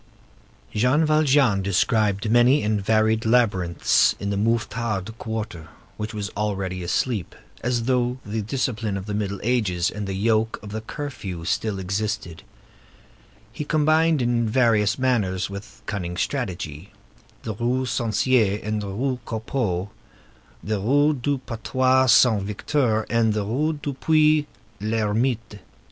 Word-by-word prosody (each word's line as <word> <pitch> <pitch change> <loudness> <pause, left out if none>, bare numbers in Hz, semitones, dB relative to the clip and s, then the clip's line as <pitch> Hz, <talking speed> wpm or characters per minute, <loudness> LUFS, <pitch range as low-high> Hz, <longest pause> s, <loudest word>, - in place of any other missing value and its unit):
Jean 125 +9 +3
Valjean 145 -9 +3
described 100 +2 +1
many 120 +5 +5
and 105 -1 0
varied 110 +1 +2
labyrinths 100 -7 +3
in 100 0 -2
the - - -1
Mouffetard 110 -1 -1
quarter, 110 -8 -5 0.3
which 105 +1 -5
was 105 -2 -4
already 95 -3 -2
asleep, 100 +2 -1 0.3
as 120 -1 0
though 125 0 +1
the 110 +2 -3
discipline 110 -2 -2
of 95 - -6
the 105 - -4
Middle 100 -2 -2
Ages 100 -7 +1
and 105 -1 -5
the 95 - -3
yoke 110 +2 +1
of 105 - -8
the 110 +1 -4
curfew 110 - -6
still 105 +2 -1
existed; 95 -2 -3 1.1
he 150 - -4
combined 155 -1 +2
in 120 -2 +1
various 110 -3 +3
manners, 105 -8 0
with 105 +3 -10
cunning 90 -4 -4
strategy, 90 - -3 0.5
the 110 - -3
Rue 125 +4 -1
Censier 115 -3 +1
and 110 0 -2
the 100 - -5
Rue 125 +6 -2
Copeau, 110 -5 -2 0.7
the 110 -1 -1
Rue 145 +8 +3
du 140 +1 -1
Battoir 130 +3 +2
Saint 115 -3 +5
Victor 110 +3 0
and 115 -2 +2
the 105 -1 -1
Rue 145 +9 0
du 145 -1 -5
Puits 155 +1 +3 0.3
l'Ermite. 110 +1 -1
110 Hz, 135 wpm, -23 LUFS, 100-125 Hz, 1.1 s, many